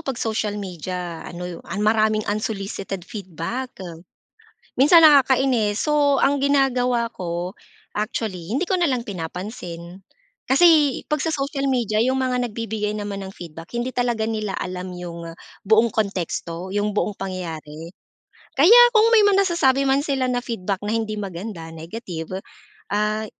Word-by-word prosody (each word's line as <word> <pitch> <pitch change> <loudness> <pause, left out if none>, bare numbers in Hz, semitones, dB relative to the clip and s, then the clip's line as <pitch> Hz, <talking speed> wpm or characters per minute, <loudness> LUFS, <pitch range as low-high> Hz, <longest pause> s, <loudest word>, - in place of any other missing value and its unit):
'pag 270 -5 -3
social 215 -2 -2
media 180 -2 -5
ano, 175 0 -7 0.2
maraming 215 0 +2
unsolicited 195 -3 -3
feedback. 205 +5 -6 1.0
Minsan 325 +5 +7
nakakainis. 265 -7 +4
So, 290 -2 +3
ang 280 +1 +3
ginagawa 250 -4 +2
ko 175 0 -4 0.5
actually 210 -5 -3
hindi 295 - +1
ko 370 0 0
na 345 - +3
lang 255 -4 0
pinapansin. 180 -1 -7 0.5
Kasi 300 -1 +5
'pag 300 -2 +1
sa 320 +1 0
social 275 0 -2
media 235 -5 0
yung 260 +3 +2
mga 250 -1 0
nagbibigay 210 -1 -3
naman 205 -1 -4
ng 190 - -10
feedback 165 0 -10
hindi 250 +2 -2
talaga 240 -3 0
nila 215 -3 -2
alam 180 0 -5
yung 170 -1 -7 0.3
buong 220 +2 +4
konteksto, 185 -3 -3
yung 205 0 -1
buong 210 - +1
pangyayari. 165 -3 -6 0.7
Kaya 405 - +8 0.2
kung 440 +1 +6
may 435 - +7
mga 395 -1 +4
nasasabi 275 -6 +2
man 270 +1 +3
sila 275 -3 -1
na 245 -1 0
feedback 200 -5 -3
na 210 +2 -2
hindi 220 -1 -1
maganda, 185 -3 -6
negative, 175 +1 -6 0.5
ah, 210 +1 0
215 Hz, 140 wpm, -22 LUFS, 185-260 Hz, 1.0 s, Kaya